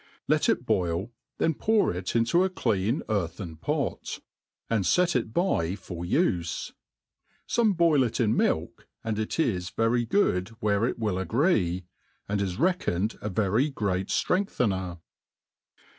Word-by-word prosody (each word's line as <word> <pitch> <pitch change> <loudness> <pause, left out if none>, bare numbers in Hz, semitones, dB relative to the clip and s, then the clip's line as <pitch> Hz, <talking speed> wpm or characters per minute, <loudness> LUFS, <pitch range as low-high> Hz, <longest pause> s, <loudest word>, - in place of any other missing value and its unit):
Let - - +2
it - - +1
boil, 90 +5 0 0.3
then 165 - +2
pour 215 - +2
it 90 +4 -4
into 120 +10 +3
a 190 - +1
clean 115 - 0
earthen 85 -5 -3
pot, - - -2 0.5
and 110 -4 +1
fet 175 - +3
it 115 -3 0
by 110 - +1
fof 85 -2 -7
life. 90 - 0 0.7
Some 225 -3 +2
boil 165 -5 +4
it 120 -3 0
in 115 -2 +2
milk, 80 +2 -1 0.2
and 110 -1 -2
it 110 - -2
i3 95 - -1
very 120 +1 +2
good 95 - +2
where 105 +1 +2
it - - -3
will. 105 -5 -1
Pgree, 95 - +1 0.4
and 100 0 -1
is 95 -3 -2
reckoned 120 - 0
a 105 - -3
very 110 +8 +1
great 100 -7 -1
ftrengthener. 100 - 0
110 Hz, 145 wpm, -27 LUFS, 90-140 Hz, 0.7 s, boil